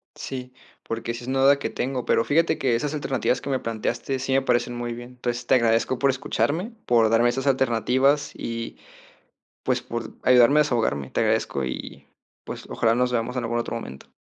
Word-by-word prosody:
Sí, 125 Hz, -1 st, -7 dB, 0.3 s
porque 115 Hz, +1 st, -4 dB
sí 120 Hz, +1 st, -7 dB
es -, -, -9 dB
una 135 Hz, +1 st, 0 dB
duda 140 Hz, +1 st, +5 dB
que -, -, -2 dB
tengo. 130 Hz, -1 st, -3 dB
Pero 115 Hz, -, +2 dB
fíjate 165 Hz, +3 st, +2 dB
que 125 Hz, -3 st, +1 dB
esas 145 Hz, +5 st, -2 dB
alternativas 135 Hz, -4 st, -1 dB
que -, -, -6 dB
me 135 Hz, -1 st, +1 dB
planteaste 115 Hz, +4 st, -3 dB
sí 135 Hz, +1 st, -1 dB
me 135 Hz, -, +4 dB
parecen 120 Hz, -2 st, 0 dB
muy 120 Hz, 0 st, -3 dB
bien. 120 Hz, +1 st, -9 dB
Entonces, 120 Hz, -1 st, -4 dB
te -, -, +5 dB
agradezco 115 Hz, +1 st, +2 dB
por 140 Hz, -, +3 dB
escucharme, 155 Hz, -, -1 dB
por 115 Hz, -2 st, +4 dB
darme 115 Hz, +2 st, +4 dB
esas 135 Hz, +3 st, -2 dB
alternativas 135 Hz, +3 st, +2 dB
y, 115 Hz, 0 st, -5 dB, 0.9 s
pues, -, -, 0 dB
por 115 Hz, 0 st, -6 dB
ayudarme 125 Hz, +3 st, +6 dB
a -, -, +6 dB
desahogarme. 110 Hz, -, -1 dB
Te -, -, 0 dB
agradezco, 70 Hz, -, 0 dB
y 65 Hz, -, -7 dB, 0.4 s
pues, -, -, -8 dB
ojalá 115 Hz, 0 st, +2 dB
nos 125 Hz, +1 st, +1 dB
veamos 120 Hz, +1 st, -1 dB
en 125 Hz, -, -1 dB
algún 120 Hz, -, -1 dB
otro 120 Hz, -, -3 dB
momento. 65 Hz, -, -9 dB
125 Hz, 200 wpm, -24 LUFS, 115-135 Hz, 0.9 s, ayudarme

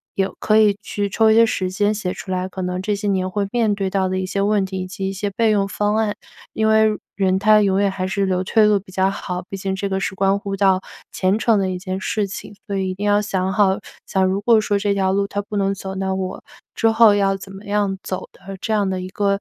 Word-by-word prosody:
有 195 Hz, 0 st, 0 dB
可 215 Hz, -, +3 dB
以 210 Hz, -2 st, +4 dB
去 205 Hz, -1 st, -3 dB
抽 220 Hz, +3 st, +3 dB
一 -, -, +4 dB
些 230 Hz, +1 st, +7 dB
时 185 Hz, -4 st, -1 dB
间 205 Hz, +2 st, +1 dB
写 200 Hz, -4 st, -3 dB
出 190 Hz, -, -8 dB
来， 185 Hz, 0 st, -1 dB
可 190 Hz, -, -6 dB
能 180 Hz, 0 st, -2 dB
这 205 Hz, +2 st, -1 dB
些 205 Hz, +1 st, -4 dB
年 185 Hz, -1 st, 0 dB
会 200 Hz, +1 st, -1 dB
面 225 Hz, -4 st, +1 dB
对 195 Hz, -1 st, -2 dB
到 190 Hz, 0 st, 0 dB
的 185 Hz, -, -1 dB
一 185 Hz, -, -2 dB
些 195 Hz, +2 st, -2 dB
问 205 Hz, -1 st, +2 dB
题 190 Hz, 0 st, -5 dB
以 185 Hz, -, -5 dB
及 195 Hz, 0 st, -4 dB
一 -, -, -4 dB
些 205 Hz, +1 st, -3 dB
备 220 Hz, +3 st, +1 dB
用 200 Hz, -2 st, +2 dB
方 205 Hz, +2 st, 0 dB
案， 215 Hz, -2 st, 0 dB, 0.4 s
因 220 Hz, 0 st, +1 dB
为 220 Hz, -1 st, +4 dB, 0.2 s
人 190 Hz, -1 st, +2 dB
他 215 Hz, +1 st, +5 dB
永 195 Hz, -1 st, +2 dB
远 200 Hz, -, +3 dB
还 185 Hz, -1 st, -3 dB
是 195 Hz, +1 st, 0 dB
留 185 Hz, -1 st, 0 dB
退 220 Hz, +2 st, +4 dB
路 210 Hz, -1 st, +4 dB
比 190 Hz, 0 st, -16 dB
较 190 Hz, 0 st, +2 dB
好， 180 Hz, -2 st, -4 dB
毕 195 Hz, -, -5 dB
竟 190 Hz, 0 st, -2 dB
这 195 Hz, +1 st, -3 dB
个 190 Hz, 0 st, -1 dB
是 195 Hz, -, -3 dB
关 195 Hz, +1 st, +2 dB
乎 200 Hz, -1 st, -4 dB
到 190 Hz, -1 st, +3 dB, 0.3 s
前 190 Hz, +2 st, +1 dB
程 225 Hz, -2 st, +3 dB
的 190 Hz, -1 st, 0 dB
一 185 Hz, -, -3 dB
件 185 Hz, 0 st, -4 dB
事 205 Hz, +1 st, -1 dB
情。 205 Hz, +1 st, -8 dB
所 200 Hz, -2 st, -2 dB
以 190 Hz, -1 st, -1 dB
一 -, -, -3 dB
定 200 Hz, +2 st, -5 dB
要 205 Hz, 0 st, +3 dB
想 190 Hz, -2 st, -1 dB
好， 195 Hz, -1 st, +3 dB, 0.3 s
假 190 Hz, -, 0 dB
如 190 Hz, +1 st, +1 dB
果 220 Hz, +1 st, +4 dB
说 205 Hz, -1 st, 0 dB
这 200 Hz, 0 st, +1 dB
条 190 Hz, -1 st, +1 dB
路 200 Hz, +1 st, +1 dB
它 205 Hz, 0 st, -3 dB
不 205 Hz, +1 st, -6 dB
能 195 Hz, 0 st, +1 dB
走， 190 Hz, 0 st, -6 dB
那 190 Hz, 0 st, -1 dB
我 185 Hz, -1 st, -4 dB, 0.3 s
之 225 Hz, -, +3 dB
后 225 Hz, -1 st, +6 dB
要 195 Hz, -1 st, +2 dB
怎 195 Hz, 0 st, -10 dB
么 195 Hz, +2 st, -11 dB
样 205 Hz, -1 st, 0 dB
走 185 Hz, -, -5 dB
的 195 Hz, +1 st, -10 dB
这 -, -, -3 dB
样 205 Hz, -3 st, +1 dB
的 185 Hz, -1 st, -2 dB
一 185 Hz, -, -6 dB
个 200 Hz, 0 st, 0 dB
195 Hz, 295 characters per minute, -20 LUFS, 190-205 Hz, 0.4 s, 些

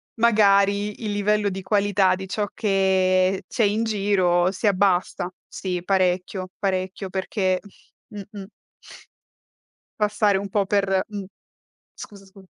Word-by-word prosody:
magari 205 Hz, -2 st, +3 dB
il 210 Hz, -, -2 dB
livello 205 Hz, 0 st, +1 dB
di 190 Hz, 0 st, -5 dB
qualità 200 Hz, -1 st, +2 dB
di 190 Hz, +1 st, -8 dB
ciò 205 Hz, +1 st, -2 dB
che 190 Hz, -2 st, +1 dB
c'è 230 Hz, -, -1 dB
in 210 Hz, +2 st, +1 dB
giro 190 Hz, -4 st, +1 dB
si 205 Hz, +3 st, -2 dB
abbassa. 185 Hz, -2 st, +1 dB, 0.2 s
Sì, 180 Hz, -2 st, -4 dB
parecchio, 185 Hz, 0 st, 0 dB
parecchio 190 Hz, -1 st, -2 dB
perché 190 Hz, -1 st, -1 dB, 0.5 s
mh-mh. 200 Hz, -1 st, -9 dB, 1.5 s
Passare 210 Hz, -1 st, +2 dB
un 200 Hz, 0 st, -5 dB
po' 200 Hz, 0 st, +1 dB
per 195 Hz, -1 st, +1 dB
mh, 205 Hz, -2 st, -6 dB, 0.7 s
scusa, 200 Hz, -1 st, -11 dB
scu 190 Hz, 0 st, -17 dB
195 Hz, 120 wpm, -23 LUFS, 185-205 Hz, 1.5 s, magari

